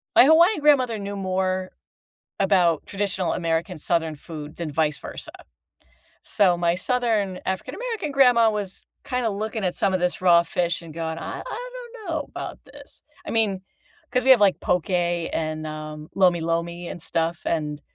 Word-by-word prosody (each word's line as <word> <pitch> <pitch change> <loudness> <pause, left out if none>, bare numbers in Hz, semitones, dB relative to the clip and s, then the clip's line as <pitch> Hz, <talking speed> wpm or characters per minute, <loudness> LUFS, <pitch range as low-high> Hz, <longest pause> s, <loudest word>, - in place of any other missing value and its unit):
My - - +9
Hawaiian 335 +5 +5
grandmother 255 -7 +3
knew 200 0 -5
more 185 -1 -1 0.7
about 180 -5 +3
traditional 195 -3 -1
American 165 +1 -1
southern 165 -1 0
food 150 -1 -9
than 170 -3 -4
vice 150 0 +1
versa. - - -8 0.9
So 190 -5 +3
my 170 -1 +2
southern 220 -4 0
African-American 390 - -3
grandma 245 -5 +5
was 205 -3 -3 0.2
kinda 250 -3 -1
looking 215 +2 -3
at 180 - -1
some 190 -1 +1
of 185 - +1
this 180 0 0
raw 170 -2 +6
fish 170 -1 -1
and 165 -2 -10
going, 160 -1 -3
"I - - -5
I - - -6
don't 475 -6 -8
know 320 -2 -1
about - - -6
this," - - -12 0.2
I - - -4
mean, 205 -4 0 0.5
'cause 250 0 +1
we 265 - +4
have, 255 -5 +8
like, 200 -2 +4
poke 180 +1 0
and, 165 -3 -1
um, 155 0 -7
lomi-lomi 170 -1 +1
and 175 - -7
stuff, 165 0 -1
and 150 -2 -1
185 Hz, 160 wpm, -24 LUFS, 165-225 Hz, 0.9 s, My